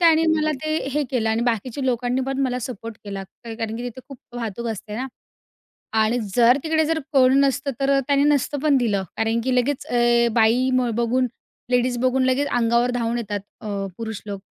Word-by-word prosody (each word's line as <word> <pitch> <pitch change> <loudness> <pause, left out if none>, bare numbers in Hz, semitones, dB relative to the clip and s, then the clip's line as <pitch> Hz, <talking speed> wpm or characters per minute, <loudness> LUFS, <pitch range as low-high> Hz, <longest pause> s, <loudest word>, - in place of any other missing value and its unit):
त्याने 325 -2 +5
मला 310 0 +1
ते 310 0 0 0.2
हे 300 +2 +1
केलं 230 -4 0
आणि 225 +1 0
बाकीच्या 240 +3 -1
लोकांनी 245 0 0
पण 270 0 -2
मला 250 -2 0
सपोर्ट 230 -3 -6
केला 200 -1 -5 0.2
कारण 225 -1 -4
की 235 - -5
तिथे 245 +1 -6
खूप 275 -3 -10 0.2
वाहतूक 235 0 -4
असते 210 -1 -6
ना 260 +3 -3 1.0
आणि 220 +3 +2 0.2
जर 245 +2 +6
तिकडे 315 0 +2
जर 320 +1 0
कोण 265 0 +5
नसतं 275 0 +1
तर 275 0 +3
त्याने 280 -1 +3
नसतं 290 -1 +1
पण 295 -3 +4
दिलं. 210 -6 0
कारण 225 +1 +1
की 260 0 0
लगेच 255 +2 0
अ, 240 0 +3
बाई 235 +3 +3
म 255 -1 +2
बघून 240 +2 +1 0.4
लेडीज 250 0 +2
बघून 255 +1 +2
लगेच 260 +3 +1
अंगावर 235 +1 +2
धावून 235 -1 -1
येतात 210 -3 -3 0.2
अ, - - -7 0.3
पुरुष 220 -2 -5
लोक. 200 -1 -5
245 Hz, 190 wpm, -22 LUFS, 230-270 Hz, 1.0 s, जर